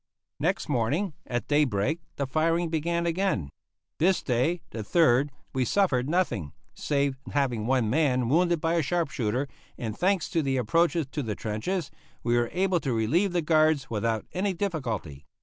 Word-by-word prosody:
Next -, -, 0 dB
morning, 145 Hz, -, 0 dB
at 120 Hz, -1 st, -2 dB
daybreak, 145 Hz, -1 st, +1 dB, 0.2 s
the 140 Hz, -, -1 dB
firing 165 Hz, +5 st, +1 dB
began 170 Hz, +2 st, 0 dB
again. 170 Hz, -, 0 dB, 0.5 s
This 185 Hz, +3 st, +3 dB
day, 135 Hz, +8 st, +1 dB
the 115 Hz, -, -6 dB
3rd, 140 Hz, +3 st, +3 dB, 0.2 s
we 130 Hz, -, +1 dB
suffered 135 Hz, -, +1 dB
nothing, 155 Hz, -, 0 dB, 0.2 s
save 140 Hz, -2 st, -1 dB
having 125 Hz, -6 st, 0 dB
one 130 Hz, -3 st, +2 dB
man 130 Hz, -1 st, +2 dB
wounded 170 Hz, +5 st, +3 dB
by 165 Hz, +2 st, 0 dB
a 170 Hz, -, +3 dB
sharp 170 Hz, 0 st, -1 dB
shooter, 125 Hz, +2 st, -1 dB, 0.3 s
and, 110 Hz, -3 st, -4 dB
thanks 190 Hz, +2 st, +1 dB
to 170 Hz, -3 st, +2 dB
the 135 Hz, -2 st, 0 dB
approaches 165 Hz, +7 st, +2 dB
to 150 Hz, -, -2 dB
the 110 Hz, -5 st, -3 dB
trenches, 140 Hz, -, -3 dB, 0.3 s
we 120 Hz, 0 st, +2 dB
were 120 Hz, -1 st, +1 dB
able 185 Hz, -1 st, +1 dB
to 135 Hz, -5 st, -2 dB
relieve 155 Hz, -, +2 dB
the 175 Hz, -2 st, 0 dB
guards 155 Hz, -4 st, +3 dB
without 110 Hz, 0 st, -1 dB
any 190 Hz, +1 st, 0 dB
difficulty. 120 Hz, -, -3 dB
145 Hz, 165 wpm, -27 LUFS, 120-170 Hz, 0.5 s, This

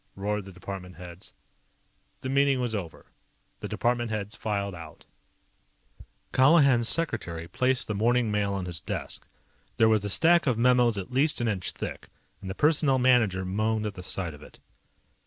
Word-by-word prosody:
P!" 95 Hz, -, -13 dB
roared 105 Hz, 0 st, -2 dB
the 95 Hz, -, -10 dB
department 90 Hz, 0 st, -8 dB
heads. 90 Hz, +3 st, -11 dB, 0.9 s
The 130 Hz, -, -4 dB
meeting 140 Hz, 0 st, +2 dB
was 120 Hz, -2 st, -2 dB
over. 90 Hz, -7 st, -6 dB, 0.5 s
The -, -, -5 dB
department 120 Hz, -1 st, -1 dB
heads 105 Hz, 0 st, -4 dB
filed 100 Hz, -3 st, -3 dB
out. 80 Hz, -3 st, -11 dB, 1.3 s
Colihan's 130 Hz, -4 st, +5 dB
secretary 85 Hz, -, +1 dB
placed 130 Hz, +7 st, 0 dB
the 105 Hz, -, -2 dB
morning 115 Hz, +2 st, +1 dB
mail 100 Hz, -1 st, 0 dB
on 95 Hz, -2 st, -3 dB
his 85 Hz, -3 st, -1 dB
desk. -, -, -6 dB, 0.5 s
There 110 Hz, -, +5 dB
was 110 Hz, -2 st, +2 dB
a 105 Hz, -, -2 dB
stack 170 Hz, -, +4 dB
of 125 Hz, -4 st, +1 dB
memos 120 Hz, -2 st, +3 dB
at 95 Hz, +3 st, -6 dB
least 145 Hz, +4 st, +2 dB
an 120 Hz, -, -1 dB
inch 100 Hz, -5 st, -1 dB
thick, -, -, -7 dB, 0.3 s
and 95 Hz, -, -7 dB
the 95 Hz, -, -5 dB
Personnel 150 Hz, -1 st, +3 dB
Manager 115 Hz, -7 st, +2 dB
moaned 110 Hz, +3 st, -1 dB
at 105 Hz, -, -3 dB
the 90 Hz, -, -9 dB
sight 90 Hz, -2 st, -3 dB
of 75 Hz, -, -14 dB
it. -, -, -15 dB
110 Hz, 175 wpm, -27 LUFS, 95-125 Hz, 1.3 s, Colihan's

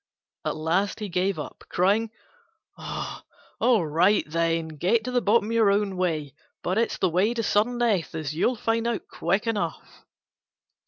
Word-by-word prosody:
At -, -, -2 dB
last 175 Hz, +8 st, 0 dB
he 210 Hz, -2 st, -4 dB
gave 185 Hz, +2 st, 0 dB
up, -, -, -7 dB
crying, 205 Hz, +5 st, +2 dB, 0.7 s
"All 230 Hz, -9 st, -2 dB
right, 175 Hz, +7 st, +3 dB
then, 165 Hz, 0 st, 0 dB
get 185 Hz, +9 st, +1 dB
to 250 Hz, -, -4 dB
the 250 Hz, -1 st, +2 dB
bottom 220 Hz, +1 st, +2 dB
your 225 Hz, -3 st, +4 dB
own 200 Hz, -1 st, +1 dB
way; 160 Hz, -6 st, -1 dB, 0.3 s
but 185 Hz, +4 st, 0 dB
it's 230 Hz, -, 0 dB
the 185 Hz, -, +2 dB
way 190 Hz, +7 st, +1 dB
to 230 Hz, -, -1 dB
sudden 220 Hz, +4 st, +1 dB
death, 215 Hz, -10 st, 0 dB
as 155 Hz, -2 st, -3 dB
you'll 235 Hz, +10 st, +1 dB
find 230 Hz, +1 st, 0 dB
out 235 Hz, -2 st, -2 dB
quick 195 Hz, +7 st, -1 dB
enough." 205 Hz, -8 st, -3 dB
200 Hz, 160 wpm, -25 LUFS, 170-225 Hz, 0.7 s, your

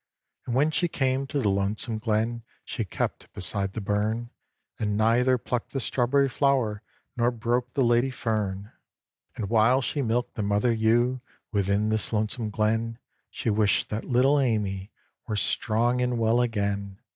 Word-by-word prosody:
And 120 Hz, -, -1 dB
when 150 Hz, +4 st, +3 dB
she 175 Hz, +2 st, +1 dB
came 135 Hz, -3 st, 0 dB
to 145 Hz, -, -3 dB
the 110 Hz, -6 st, +1 dB
lonesome 100 Hz, +3 st, -1 dB
glen, 115 Hz, +1 st, 0 dB, 0.2 s
She 115 Hz, -, -3 dB
kept 95 Hz, -, -4 dB
beside 95 Hz, +1 st, -1 dB
the 110 Hz, -, -4 dB
burn, 105 Hz, +4 st, -1 dB, 0.5 s
And 105 Hz, -2 st, 0 dB
neither 120 Hz, +4 st, +3 dB
plucked 120 Hz, 0 st, -4 dB
the 135 Hz, -, -1 dB
strawberry 135 Hz, +3 st, +2 dB
flower, 130 Hz, -6 st, +1 dB, 0.3 s
Nor 120 Hz, 0 st, +2 dB
broke 120 Hz, +1 st, -2 dB
the 135 Hz, -, +3 dB
lady 120 Hz, +2 st, +3 dB
fern. 105 Hz, -5 st, -2 dB, 0.6 s
And 105 Hz, -, -3 dB
while 115 Hz, +4 st, +4 dB
she 140 Hz, +2 st, -1 dB
milked 120 Hz, 0 st, -1 dB
the -, -, -3 dB
mother 105 Hz, +4 st, +2 dB
ewe 120 Hz, +3 st, +2 dB, 0.3 s
Within 100 Hz, +1 st, +1 dB
this 110 Hz, -1 st, 0 dB
lonesome 110 Hz, +1 st, -1 dB
glen, 110 Hz, +2 st, 0 dB, 0.3 s
She 115 Hz, -, -2 dB
wished 105 Hz, -1 st, +2 dB
that 105 Hz, +1 st, -2 dB
little 135 Hz, +3 st, +3 dB
Amy 105 Hz, -6 st, -1 dB, 0.4 s
Were 110 Hz, -, -2 dB
strong 120 Hz, +4 st, +1 dB
and 125 Hz, -1 st, 0 dB
well 115 Hz, +1 st, +3 dB
again. 100 Hz, -4 st, -2 dB
115 Hz, 155 wpm, -26 LUFS, 105-125 Hz, 0.6 s, while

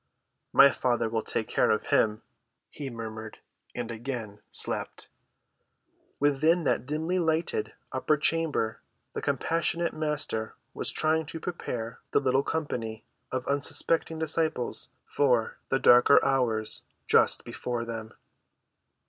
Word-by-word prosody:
"My 140 Hz, 0 st, +8 dB
Father 120 Hz, -3 st, 0 dB
will 110 Hz, 0 st, -1 dB
take 110 Hz, -, -3 dB
care -, -, +2 dB
of 110 Hz, -, +2 dB
him," 105 Hz, -1 st, +2 dB, 0.5 s
he 140 Hz, -2 st, -6 dB
murmured, 110 Hz, -2 st, -7 dB, 0.4 s
and 120 Hz, -1 st, -4 dB
again 115 Hz, -3 st, -5 dB
slept. -, -, -1 dB, 1.1 s
Within 155 Hz, +4 st, +3 dB
that 125 Hz, -4 st, 0 dB
dimly‐lighted 160 Hz, -3 st, 0 dB, 0.2 s
upper 140 Hz, +3 st, +1 dB
chamber 150 Hz, -8 st, 0 dB, 0.3 s
the -, -, -3 dB
compassionate 170 Hz, +1 st, 0 dB
Master 150 Hz, -8 st, -2 dB, 0.2 s
was -, -, -2 dB
trying 160 Hz, 0 st, 0 dB
to 165 Hz, -, -6 dB
prepare 125 Hz, -9 st, -5 dB
the -, -, +5 dB
little 135 Hz, -1 st, +2 dB
company 120 Hz, -8 st, -3 dB, 0.3 s
of 130 Hz, -1 st, -2 dB
unsuspecting 160 Hz, +3 st, 0 dB
disciples 160 Hz, -5 st, -1 dB, 0.2 s
for 125 Hz, -6 st, +1 dB
the 135 Hz, -, +3 dB
darker 125 Hz, +1 st, +7 dB
hours 120 Hz, -5 st, +1 dB, 0.3 s
just -, -, +4 dB
before 120 Hz, -1 st, -3 dB
them. 115 Hz, -1 st, -6 dB
135 Hz, 115 wpm, -28 LUFS, 115-155 Hz, 1.1 s, My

